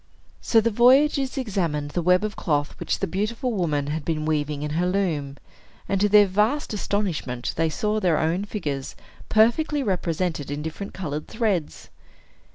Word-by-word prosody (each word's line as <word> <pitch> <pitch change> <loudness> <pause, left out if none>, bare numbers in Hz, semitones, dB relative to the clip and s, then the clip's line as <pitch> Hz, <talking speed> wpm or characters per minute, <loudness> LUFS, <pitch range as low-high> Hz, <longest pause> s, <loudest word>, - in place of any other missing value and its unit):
So 230 - +4
the 230 +1 +1
voyagers 265 +4 +4
examined 170 - -2
the 175 - -1
web 180 +3 +3
of 215 -1 -3
cloth 145 -3 -1
which - - -1
the - - -1
beautiful 215 +7 -2
woman 155 -8 0
had 150 +2 -3
been 155 0 -2
weaving 150 -2 -1
in 150 - -3
her 170 +4 0
loom; 160 -8 -1 0.5
and, 195 -1 0
to 205 - +3
their 210 0 +7
vast 210 +9 0
astonishment, 185 -12 -2
they 165 0 +1
saw 210 +7 -1
their 175 -6 +2
own 170 +5 0
figures 145 -10 -4 0.3
perfectly 275 +7 +3
represented 175 - -2
in 145 +1 -4
different 160 +5 -6
colored 155 -5 -4
threads. 210 -9 -2
180 Hz, 165 wpm, -24 LUFS, 155-215 Hz, 0.5 s, their